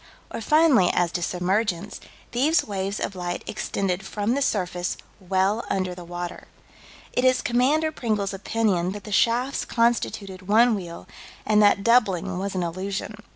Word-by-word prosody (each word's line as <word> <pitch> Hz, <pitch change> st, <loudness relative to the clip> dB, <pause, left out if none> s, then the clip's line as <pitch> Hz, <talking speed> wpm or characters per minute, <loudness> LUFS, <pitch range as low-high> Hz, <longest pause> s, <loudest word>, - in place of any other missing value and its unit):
Or -, -, -5 dB
finally 290 Hz, -, +4 dB
as 175 Hz, -1 st, +1 dB
to 175 Hz, -, -3 dB
submergence 180 Hz, +1 st, -1 dB, 0.3 s
"These 305 Hz, +8 st, +2 dB
waves 195 Hz, 0 st, -3 dB
of -, -, -3 dB
light 175 Hz, -1 st, -4 dB
extended 190 Hz, -1 st, -2 dB
from 205 Hz, +3 st, -1 dB
the 280 Hz, -, -1 dB
surface 180 Hz, -8 st, -1 dB, 0.2 s
well 190 Hz, +4 st, 0 dB
under 185 Hz, -2 st, -1 dB
the 180 Hz, 0 st, -9 dB
water." 175 Hz, 0 st, -7 dB, 0.7 s
It 250 Hz, -, +1 dB
is 255 Hz, 0 st, +3 dB
Commander 285 Hz, +6 st, +2 dB
Pringle's 215 Hz, -8 st, -2 dB
opinion 195 Hz, -3 st, 0 dB
that 205 Hz, -1 st, -8 dB
the 210 Hz, -, -9 dB
shafts 240 Hz, +6 st, +2 dB
constituted 205 Hz, -5 st, -1 dB
one 230 Hz, +3 st, +5 dB
wheel, 175 Hz, -5 st, -6 dB, 0.4 s
and 215 Hz, -1 st, +4 dB
that 205 Hz, -1 st, +4 dB
doubling 195 Hz, -6 st, +2 dB
was 195 Hz, 0 st, -3 dB
an 180 Hz, -, 0 dB
illusion. 190 Hz, +4 st, -4 dB
200 Hz, 155 wpm, -24 LUFS, 185-230 Hz, 0.7 s, one